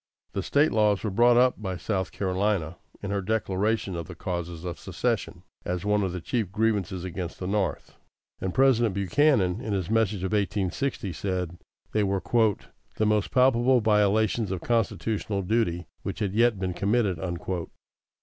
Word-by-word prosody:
The 100 - -1
State 145 +10 +2
laws 105 -2 +2
were 110 - -1
brought 120 +4 +5
up 125 -2 +3
by 95 -3 -3
South 95 -4 -2
Carolina, 95 -3 -1 0.3
in 100 - -3
her 100 -1 0
declaration 105 -1 0
of 85 -2 -5
the - - -9
causes 85 -1 -4
of 85 - -5
secession, - - -2 0.2
as 90 +1 -3
one 105 0 +2
of 95 -2 -1
the 90 - -4
chief 105 +2 -2
grievances 105 -4 0
against 90 -1 -5
the 90 - -5
North; 100 -1 -2 0.4
and 95 - -2
President 120 -4 +3
Buchanan, 100 - +2
in 110 - -2
his 95 0 -2
Message 110 -4 +1
of 95 - -2
1860, 100 +1 -1
said 90 -1 -3 0.3
they 110 - +1
were 100 -1 0 0.8
"the 110 - +1
most 105 -5 +2
palpable 125 +4 +4
violations 110 0 +2
of 95 -2 -3
constitutional 110 -3 -1
duty 90 -4 0 0.2
which - - -4
had 100 -3 -2
yet 115 0 +3
been 95 -1 -2
committed." 100 -2 +1
100 Hz, 160 wpm, -26 LUFS, 90-110 Hz, 0.8 s, brought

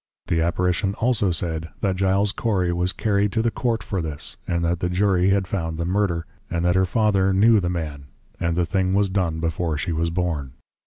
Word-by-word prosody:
_ - - -15
The 80 - +2
Apparition 90 +4 0
also 115 -5 +1
said, 80 -1 -2
That 95 -3 +1
Giles 95 +2 +2
Cory, 95 -7 0
was 90 +1 0
carry'd 100 0 0
to 110 - +1
the 115 - +1
Court 115 -2 -1
for 95 -4 -2
this, 75 -3 -5
and 85 -1 0
that 85 +1 0
the 90 - -1
Jury 95 0 +2
had 100 -1 +2
found 80 -4 -3
the 85 - -2
Murder, 90 -3 0 0.2
and 85 0 -1
that 90 - +3
her 95 +1 +3
Father 100 -1 +2
knew 110 +3 +5
the 90 -2 -1
man, 75 -5 -4 0.3
and 85 0 0
the 90 - +2
thing 95 +2 0
was 100 -1 +2
done 85 -5 0
before 80 -1 -1
she 85 - -2
was 85 +1 0
born. 80 -7 -2
90 Hz, 215 wpm, -23 LUFS, 85-100 Hz, 0.3 s, knew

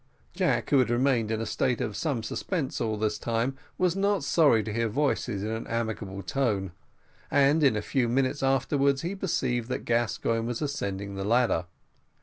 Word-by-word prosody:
Jack, - - 0
who 140 - +6
had 125 -3 +2
remained 120 -2 +2
in 110 0 -1
a - - -2
state 120 +2 0
of 105 - -3
some 135 -6 -1
suspense 160 - -3
all 110 -2 -1
this 105 0 -1
time, 115 +3 -1 0.2
was 180 -1 +2
not 200 -3 +1
sorry 140 -8 +4
to 110 - -4
hear 115 0 0
voices 125 -5 -1
in 110 - -2
an 110 0 -4
amicable 110 -4 -3
tone, 105 -9 -1 0.6
and 140 +3 +4
in 135 -6 +5
a 105 - -2
few 125 0 0
minutes 130 +3 +1
afterwards 135 +1 +2
he 175 +3 -2
perceived 130 -11 -1
that - - -3
Gascoigne 115 0 0
was 120 -1 -3
ascending 100 -9 -3
the 95 0 -4
ladder. 115 -5 +2
120 Hz, 180 wpm, -27 LUFS, 110-140 Hz, 0.6 s, who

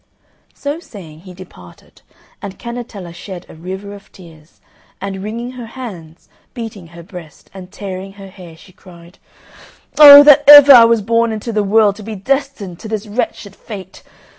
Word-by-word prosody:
So 290 +3 -6
saying, 175 - -14
he 185 +2 -14
departed, 90 - -17 0.4
and 200 -1 -9
Cannetella 235 -7 -9
shed 180 0 -11
a - - -15
river 190 +5 -9
of 200 -1 -16
tears, 165 -4 -19 0.4
and, 195 0 -7
wringing 230 +4 -7
her 250 -2 -11
hands, 190 -10 -12 0.3
beating 220 -7 -9
her 170 0 -15
breast, 170 -4 -14
and 185 -1 -13
tearing 195 -1 -9
her 195 -1 -14
hair, 180 -4 -15
she 185 - -19
cried, 175 -1 -19 0.8
"Oh, 285 -1 +10
that 290 -1 +5
ever 290 -1 +10
I 235 -3 +8
was 230 -2 0
born 230 +2 0
into 220 +2 -6
the 215 - 0
world 205 0 +1
to - - -12
be 220 +1 -8
destined 245 -5 -4
to - - -10
this 215 -1 -5
wretched 205 -2 -6
fate! 190 -4 -12
200 Hz, 165 wpm, -15 LUFS, 180-230 Hz, 0.8 s, Oh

